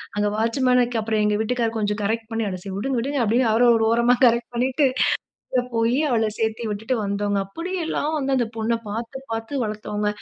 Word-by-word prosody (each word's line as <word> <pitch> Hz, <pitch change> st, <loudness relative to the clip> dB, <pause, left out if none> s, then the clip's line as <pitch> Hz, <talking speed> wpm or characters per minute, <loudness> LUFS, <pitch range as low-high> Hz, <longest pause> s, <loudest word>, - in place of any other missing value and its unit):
அங்க 205 Hz, 0 st, +1 dB
வாட்ச்மேன்க்கு 245 Hz, +1 st, +2 dB
அப்புறம் 215 Hz, -1 st, 0 dB
எங்க 210 Hz, 0 st, +2 dB
வீட்டுக்காரர் 230 Hz, 0 st, -1 dB
கொஞ்சம் 210 Hz, 0 st, -1 dB
கரெக்ட் 225 Hz, +2 st, -1 dB
பண்ணி 225 Hz, 0 st, -1 dB
அ -, -, -4 dB, 0.3 s
விடுங்க 265 Hz, +6 st, -1 dB
விடுங்க 275 Hz, +4 st, -1 dB
அப்படின்னு 230 Hz, +2 st, +2 dB
அவர 230 Hz, +2 st, +3 dB
ஒரு 225 Hz, 0 st, +2 dB
ஓரமா, 235 Hz, +1 st, +4 dB
கரெக்ட் 235 Hz, 0 st, +2 dB
பண்ணிட்டு 260 Hz, +4 st, +2 dB, 0.7 s
அங்க 250 Hz, -, +2 dB
போய் 230 Hz, +2 st, +2 dB
அவள 225 Hz, -4 st, +2 dB
சேர்த்து 225 Hz, +1 st, -1 dB
விட்டுட்டு 220 Hz, +5 st, -2 dB
வந்தோம்ங்க. 200 Hz, 0 st, -1 dB
அப்படியெல்லாம் 330 Hz, -, -3 dB
வந்து 270 Hz, -1 st, 0 dB
அந்த 240 Hz, -2 st, +1 dB
பொண்ண 225 Hz, +1 st, 0 dB
பார்த்து 230 Hz, +5 st, -5 dB
பார்த்து 225 Hz, +4 st, -2 dB
வளர்த்தோங்க. 210 Hz, -1 st, -2 dB
230 Hz, 175 wpm, -23 LUFS, 220-250 Hz, 0.7 s, ஓரமா